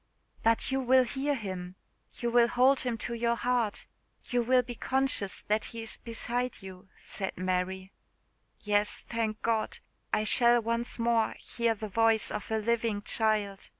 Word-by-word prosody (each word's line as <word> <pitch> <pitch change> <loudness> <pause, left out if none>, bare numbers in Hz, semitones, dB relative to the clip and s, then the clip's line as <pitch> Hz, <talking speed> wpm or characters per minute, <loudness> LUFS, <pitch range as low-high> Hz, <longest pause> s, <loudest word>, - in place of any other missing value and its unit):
"But 230 +3 +2
you 270 - +1
will 260 0 +5
hear 275 +3 -1
him 185 -5 -6 0.4
you 240 -1 -2
will 235 0 +5
hold 255 +3 +4
him 245 -3 -1
to 235 - -3
your 235 0 +1
heart 235 -3 -1 0.4
you 245 -1 +1
will 250 +1 +3
be 245 0 -6
conscious 265 -5 0
that 215 +1 +1
he 230 -1 -7
is 225 - -3
beside 240 0 -3
you," 190 0 -11
said 190 -2 -5
Mary. 185 +1 -2 0.7
"Yes, 205 0 +1
thank 225 -2 -2
God! 225 -1 0 0.3
I 215 - +2
shall 240 +2 +5
once 230 +1 -2
more 230 -1 +1
hear 235 -1 -1
the 215 0 -6
voice 225 +1 +2
of 210 - -5
a 220 - 0
living 220 -1 0
child! 210 -3 0
230 Hz, 160 wpm, -29 LUFS, 210-240 Hz, 0.7 s, will